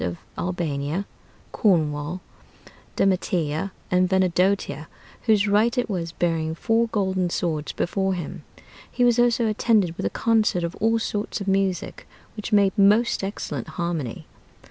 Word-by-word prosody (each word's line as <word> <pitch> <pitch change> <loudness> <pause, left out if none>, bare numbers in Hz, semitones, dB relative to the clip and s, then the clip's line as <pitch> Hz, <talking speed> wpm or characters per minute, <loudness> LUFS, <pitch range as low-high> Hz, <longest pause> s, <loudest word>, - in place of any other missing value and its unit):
of 85 -1 -3 0.2
Albania, 170 0 -2 0.5
Cornwall, 160 -3 +1 0.7
Demetia, 180 -3 0 0.2
and 180 0 +3
Venedotia, 185 -4 +1 0.4
whose 215 -2 +4
right 220 +5 +2
it 245 - +1
was, 170 -5 -3
bearing 165 -2 -1
four 230 +5 +1
golden 190 -4 0
swords 160 -4 -2
before 190 +1 -1
him. 170 -4 -6 0.5
He 245 - 0
was 240 -1 +4
also 240 -1 +3
attended 215 -5 +2
with - - -3
a - - -1
concert 220 -6 +1
of 170 +1 -2
all 225 +1 +2
sorts 210 -2 -3
of 200 - -6
music, 195 -3 -1 0.3
which 210 0 -6
made 200 -2 +4
most 210 +3 +4
excellent 150 - -4
harmony. 165 -8 -3
190 Hz, 135 wpm, -24 LUFS, 165-210 Hz, 0.7 s, whose